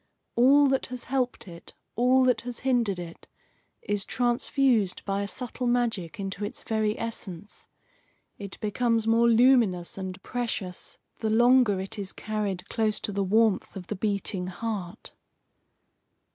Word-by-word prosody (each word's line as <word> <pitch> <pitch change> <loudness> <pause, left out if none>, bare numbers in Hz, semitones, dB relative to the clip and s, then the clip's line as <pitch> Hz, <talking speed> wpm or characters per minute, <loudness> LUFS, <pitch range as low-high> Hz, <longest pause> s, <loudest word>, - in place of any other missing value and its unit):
All 280 +4 +6
that 270 0 0
has 250 -1 -6
helped 255 -4 -2
it, 170 -1 -12 0.2
all 255 +2 +4
that 250 -4 +2
has 245 -1 -7
hindered 240 -7 +1
it, 170 -1 -9 0.6
is 205 -1 -1
transfused 240 -3 +1
by 195 0 -1
a 200 - -2
subtle 250 +2 -4
magic 230 -9 -1
into 195 0 -4
its 205 - -5
very 215 -1 0
essence. 205 -4 -7 0.7
It 200 -1 -8
becomes 225 +1 +1
more 230 +1 +4
luminous 225 -7 +3
and 190 0 -5
precious 230 -7 -4 0.2
the 220 - -1
longer 240 -2 +4
it 195 +3 -6
is 195 -1 -5
carried 205 -4 -3
close 220 -2 0
to - - -3
the 200 0 -1
warmth 215 +1 +2
of 185 -2 -7
the 210 - -4
beating 200 -2 -2
heart. 190 -2 -5
220 Hz, 145 wpm, -27 LUFS, 195-245 Hz, 0.7 s, All